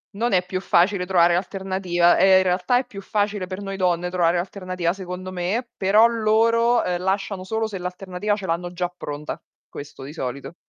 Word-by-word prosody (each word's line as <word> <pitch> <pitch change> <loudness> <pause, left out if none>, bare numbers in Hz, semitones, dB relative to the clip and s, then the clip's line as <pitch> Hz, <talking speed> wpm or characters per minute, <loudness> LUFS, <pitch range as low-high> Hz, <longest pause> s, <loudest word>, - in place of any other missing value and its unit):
Non 235 +4 0
è 180 -2 +2
più 185 0 -3
facile 180 +1 +2
trovare 175 -2 +4
l'alternativa, 185 -1 +1
ehm, 190 0 +6
in 190 - +4
realtà 185 +6 +1
è 255 - -1
più 205 -5 -9
facile 205 -1 -1
per 185 +2 -6
noi 195 -1 -5
donne 180 -2 0
trovare 175 -1 +2
l'alternativa 185 -1 -2
secondo 185 -1 -7
me, 190 +7 -2
però 210 +4 +5
loro 230 +1 +3 0.2
lasciano 190 +1 -2
solo 220 +3 -2
se 205 -3 -6
l'alternativa 180 +2 -3
ce 200 - -6
l'hanno 175 +1 -2
già 180 0 -2
pronta, 150 -3 -6 0.3
questo 140 -1 -10
di 140 +3 -8
solito. 140 +1 -5
185 Hz, 180 wpm, -23 LUFS, 175-205 Hz, 0.3 s, ehm